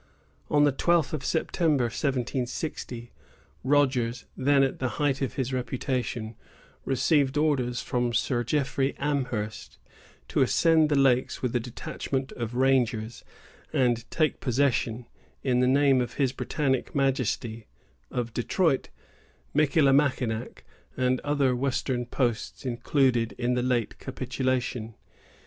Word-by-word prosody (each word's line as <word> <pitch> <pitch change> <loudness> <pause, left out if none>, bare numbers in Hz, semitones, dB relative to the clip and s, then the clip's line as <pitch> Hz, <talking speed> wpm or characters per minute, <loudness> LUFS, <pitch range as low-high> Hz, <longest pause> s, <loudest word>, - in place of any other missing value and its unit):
On 145 0 +4
the 145 - +5
twelfth 165 +3 +1
of 150 -3 -3
September, 160 -4 +1
1760, 125 -1 -3 0.5
Rogers, 130 -3 +1
then 140 +1 +3
at 135 - -1
the 130 - 0
height 145 -2 +1
of 135 - -2
his 130 -1 -2
reputation, 125 -2 -3 0.5
received 140 +1 +2
orders 130 -5 +1
from 120 -1 0
Sir 120 +1 0
Jeffrey 135 +1 0
Amherst 125 -7 -3 0.5
to - - +1
ascend 160 -2 +4
the 145 - +2
lakes 130 -2 +2
with 125 -1 -1
a - - +3
detachment 130 +2 -4
of 120 -1 -5
rangers, 120 -4 +1 0.5
and 120 -3 +1
take 155 -2 0
possession, 125 -3 0 0.4
in 125 -2 +2
the 125 - +3
name 135 -1 +4
of 125 - -3
his 135 -3 +1
Britannic 130 -1 -1
Majesty, 125 -5 -1 0.4
of 120 -2 -3
Detroit, 145 +3 +1 0.6
Michillimackinac, 135 -5 +2 0.3
and 130 0 +1
other 145 -3 +1
western 125 -1 -1
posts 120 0 -2
included 120 -1 +1
in 125 0 -1
the 125 - +1
late 120 -3 -1
capitulation. 125 -4 -2
130 Hz, 120 wpm, -27 LUFS, 120-140 Hz, 0.6 s, the